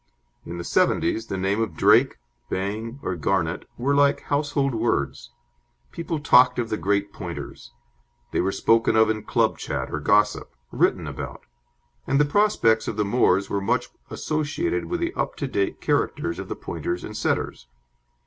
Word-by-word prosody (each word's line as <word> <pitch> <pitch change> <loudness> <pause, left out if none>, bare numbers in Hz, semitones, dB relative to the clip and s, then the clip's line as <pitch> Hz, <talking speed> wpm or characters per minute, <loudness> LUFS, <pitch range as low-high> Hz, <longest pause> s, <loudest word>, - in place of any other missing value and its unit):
In 85 - -6
the 85 - -5
'seventies 110 - +1
the 95 - -3
name 95 +3 0
of 110 - -2
Drake, - - +4 0.3
Bang, 110 +7 -3
or 90 - -2
Garnet 85 0 -1
were 135 +4 0
like 140 0 +3
household 145 -2 0
words. 70 - -1 0.6
People 165 -1 -4
talked 125 -3 +5
of 120 -2 -1
the 110 - -1
great 100 0 0
Pointers. 85 -2 -8 0.6
They - - +1
were 95 +2 0
spoken 115 +2 +2
of 110 0 +5
in 110 -1 -3
club 105 - 0
chat - - -4
or 75 - -1
gossip; 105 +8 +1 0.2
written - - +1
about; - - -7 0.6
and 140 - +2
the 145 - +5
prospects 145 - +2
of 110 - -3
the 105 - +1
moors 100 -3 +2
were 100 - -2
much 100 - 0 0.2
associated 245 - -2
with 350 -1 -3
the 340 +1 -1
up - - -2
to 140 - -3
date 100 -6 -2
characters 85 - 0
of - - -7
the - - -3
Pointers 90 +1 -4
and 105 - -7
Setters. 85 - -2
110 Hz, 170 wpm, -24 LUFS, 95-140 Hz, 0.6 s, talked